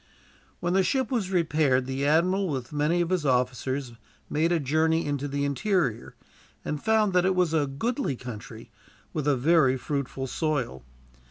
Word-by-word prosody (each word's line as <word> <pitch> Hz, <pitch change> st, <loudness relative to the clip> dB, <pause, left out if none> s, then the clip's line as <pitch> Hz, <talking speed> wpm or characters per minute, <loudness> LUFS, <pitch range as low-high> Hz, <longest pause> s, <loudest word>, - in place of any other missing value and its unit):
When 175 Hz, 0 st, 0 dB
the 190 Hz, -, +4 dB
ship 255 Hz, +7 st, 0 dB
was 220 Hz, -7 st, 0 dB
repaired, 155 Hz, -7 st, +2 dB
the 135 Hz, +2 st, -2 dB
admiral, 180 Hz, +5 st, +2 dB
with 130 Hz, -2 st, -4 dB
many 150 Hz, +4 st, +1 dB
of 170 Hz, +1 st, -1 dB
his 180 Hz, -4 st, +1 dB
officers, 130 Hz, 0 st, 0 dB, 0.4 s
made 160 Hz, +3 st, +1 dB
a 170 Hz, -, +2 dB
journey 160 Hz, +3 st, +1 dB
into 145 Hz, -1 st, -2 dB
the 140 Hz, 0 st, -1 dB
interior, 140 Hz, -, -1 dB, 0.5 s
and 150 Hz, -1 st, -3 dB
found 220 Hz, -3 st, +2 dB
that 180 Hz, -1 st, +4 dB
it 190 Hz, 0 st, +2 dB
was 180 Hz, -3 st, +2 dB
a 150 Hz, -3 st, +2 dB
goodly 225 Hz, -, -2 dB
country, 120 Hz, -4 st, -9 dB, 0.4 s
with 150 Hz, -2 st, -2 dB
a 140 Hz, -2 st, +3 dB
very 135 Hz, -1 st, +3 dB
fruitful 135 Hz, 0 st, -3 dB
soil. 135 Hz, -, -2 dB
150 Hz, 165 wpm, -26 LUFS, 135-175 Hz, 0.5 s, the